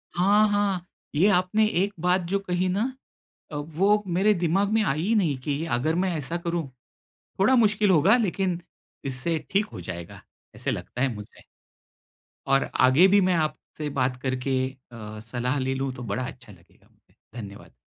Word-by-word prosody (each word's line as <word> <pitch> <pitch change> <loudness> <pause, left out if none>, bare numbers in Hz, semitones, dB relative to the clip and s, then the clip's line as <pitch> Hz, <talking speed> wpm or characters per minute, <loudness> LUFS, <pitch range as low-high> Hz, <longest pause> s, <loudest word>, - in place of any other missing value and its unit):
हाँ, 205 +4 +4
हाँ। 200 -3 0 0.3
ये 170 +7 +4
आपने 200 +3 +3
एक 200 0 0
बात 180 +2 +2
जो 200 +1 +1
कही 185 -1 -1
ना 190 +3 0 0.7
अ, - - -6
वो 180 +8 +1
मेरे 190 +4 +3
दिमाग 185 +2 +1
में 220 - +3
आई 155 -5 0
ही 205 +7 +1
नहीं 165 -10 +2
कि 145 +2 -2
अगर 155 +7 0
मैं 185 +1 +1
ऐसा 155 +3 -3
करूँ, 170 -3 -3 0.7
थोड़ा 215 +7 +5
मुश्किल 210 -3 +3
होगा, 185 +6 +5
लेकिन 190 -5 -1 0.4
इससे 135 +5 -1
ठीक 200 +3 +2
हो 90 - -7
जाएगा। 85 -1 -8 0.3
ऐसा - - -2
लगता 125 - -5
है 130 -2 +1
मुझे। 105 +1 -11 1.0
और 135 0 +2 0.2
आगे 135 +9 +6
भी 200 +1 +5
मैं 185 - +3
आपसे 155 -1 -3
बात 125 0 +1
करके 130 0 -1 0.3
अ, 110 -2 -8
सलाह 120 +5 -2
ले 130 0 -1
लूँ, 135 0 -2
तो 125 - -8
बड़ा 115 +3 -2
अच्छा 125 -4 -11
लगेगा 90 -2 -21
मुझे। - - -34 0.3
धन्यवाद। 100 -1 -11
170 Hz, 170 wpm, -25 LUFS, 130-195 Hz, 1.0 s, आगे